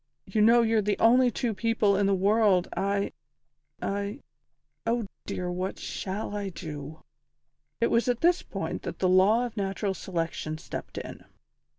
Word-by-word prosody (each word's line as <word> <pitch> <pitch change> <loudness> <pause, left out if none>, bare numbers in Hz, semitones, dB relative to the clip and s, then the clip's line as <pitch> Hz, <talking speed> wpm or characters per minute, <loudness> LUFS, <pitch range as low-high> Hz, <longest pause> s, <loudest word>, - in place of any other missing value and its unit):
You 215 - 0
know 235 +2 +6
you're 225 -1 +3
the 205 0 0
only 250 +2 +5
two 235 -1 -1
people 215 -1 +2
in 200 0 +2
the 195 - +3
world 200 -1 +3
I 200 0 0 0.7
I 200 +5 -3 0.6
Oh 230 -1 0 0.2
dear, 180 -1 -3
what 185 +2 -3
shall 205 +2 -4
I 200 -1 -2
do!" 155 -3 -8 0.8
It 235 - +2
was 230 +2 +2
at 245 -1 0
this 350 +1 +4
point - - -4
that - - -6
the 185 - +1
Law 195 +6 +5
of 235 - -7
Natural 195 -1 -1
Selection 165 -4 -3
stepped - - -7
in. - - -7
200 Hz, 160 wpm, -28 LUFS, 190-230 Hz, 0.8 s, know